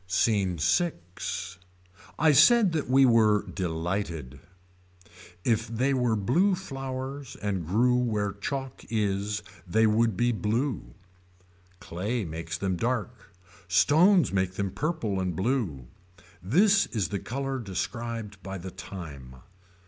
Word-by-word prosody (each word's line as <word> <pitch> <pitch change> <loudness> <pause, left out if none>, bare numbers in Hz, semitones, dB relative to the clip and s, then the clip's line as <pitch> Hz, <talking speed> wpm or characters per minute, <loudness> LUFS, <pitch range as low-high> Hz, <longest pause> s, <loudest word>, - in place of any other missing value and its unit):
SCENE 95 0 +2
IV. 90 - -2 0.6
I 155 0 +5
said 190 - +6
that 155 -5 -2
we 135 +1 +6
were 110 -4 +4
delighted. 85 -5 -3 1.0
If 115 0 +1
they 125 +5 0
were 125 -4 +1
blue 165 - +2
flowers 135 -4 -6
and 95 -4 -3
grew 120 +7 +3
where 110 -5 0
chalk 135 +5 -5
is 105 -1 -1 0.2
they 110 +6 +3
would 110 -1 +2
be 120 +3 +2
blue. 115 +4 -2 0.8
Clay 105 +6 -3
makes 80 +1 -5
them 95 -1 -1
dark. 120 -2 -3 0.4
Stones 160 - +4
make 95 -1 0
them 100 -1 -2
purple 140 - -2
and 90 -2 -2
blue. 95 - -1 0.6
This 195 - +4
is 105 -6 -2
the 100 - -2
color 135 +4 -3
described 115 0 -5
by 95 0 -6
the 95 +1 -7
time. 70 -12 -9
110 Hz, 120 wpm, -27 LUFS, 95-130 Hz, 1.0 s, said